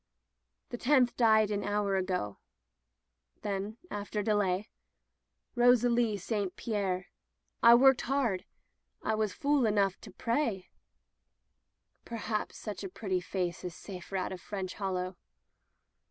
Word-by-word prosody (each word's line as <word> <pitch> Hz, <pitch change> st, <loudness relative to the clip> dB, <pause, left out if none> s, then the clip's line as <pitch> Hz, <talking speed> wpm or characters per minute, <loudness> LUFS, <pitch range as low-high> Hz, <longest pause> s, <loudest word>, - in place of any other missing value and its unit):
"The 240 Hz, -, -6 dB
tenth 255 Hz, -2 st, +3 dB
died 220 Hz, -3 st, +4 dB
an 205 Hz, -1 st, -1 dB
hour 205 Hz, -1 st, 0 dB
ago/* 180 Hz, -, -2 dB, 1.0 s
Then, 205 Hz, +2 st, -3 dB
after 205 Hz, 0 st, -3 dB
delay 205 Hz, -1 st, +1 dB, 0.4 s
— -, -, -50 dB
"Rosalie 240 Hz, -2 st, +4 dB
St 200 Hz, -1 st, -2 dB
Pierre 195 Hz, -5 st, -1 dB, 0.5 s
1 235 Hz, +1 st, +8 dB
worked 270 Hz, -1 st, +6 dB
hard. 240 Hz, -8 st, 0 dB, 0.6 s
I 220 Hz, -, +1 dB
was 215 Hz, -2 st, 0 dB
fool 280 Hz, +1 st, +2 dB
enough 200 Hz, -3 st, +1 dB
to -, -, -10 dB
pray," 230 Hz, -6 st, -1 dB, 1.3 s
"Perhaps 225 Hz, -2 st, -3 dB
such 205 Hz, -3 st, -6 dB
a 195 Hz, -, -4 dB
pretty 185 Hz, -1 st, -2 dB
face 180 Hz, -1 st, -3 dB
is 180 Hz, -1 st, -5 dB
safer 190 Hz, 0 st, -6 dB
out 185 Hz, -, -2 dB
of 185 Hz, -2 st, -6 dB
French 190 Hz, -2 st, -5 dB
Hollow.' 185 Hz, -2 st, -3 dB
205 Hz, 125 wpm, -31 LUFS, 190-230 Hz, 1.3 s, 1